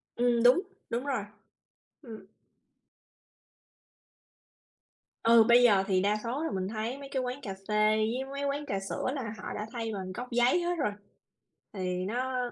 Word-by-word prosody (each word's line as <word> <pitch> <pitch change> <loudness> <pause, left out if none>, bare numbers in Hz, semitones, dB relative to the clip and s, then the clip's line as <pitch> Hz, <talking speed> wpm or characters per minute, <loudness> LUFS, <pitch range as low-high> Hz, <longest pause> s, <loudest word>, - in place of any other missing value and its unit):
Ừm, 240 -1 +2
đúng, 250 +8 +6 0.3
đúng 240 +4 -2
rồi. 255 -7 -1 0.8
Ừm. 225 -6 -10 3.0
Ừ, 230 0 +7
bây 240 +2 +6
giờ 200 -5 +5
thì 190 -2 +2
đa 205 +2 +2
số 250 +6 -2
là 325 - -1
mình 190 -1 -2
thấy 225 +5 -3
mấy 280 -1 -9
cái 265 - 0
quán 250 +2 -4
cà 195 - -5
phê 215 0 +3
với 230 +5 0
mấy 280 0 -3
quán 280 +1 -1
trà 195 - -1
sữa 195 - -4
là 235 -6 -4
họ - - -6
đã 210 - -4
thay 225 -2 -3
bằng 185 -2 -5
cốc 250 +6 -7
giấy 245 +8 +3
hết 350 +1 0
rồi, 210 -9 0 0.8
thì 185 -2 -2
nó 250 +3 -2
235 Hz, 170 wpm, -29 LUFS, 210-255 Hz, 3.0 s, Ừ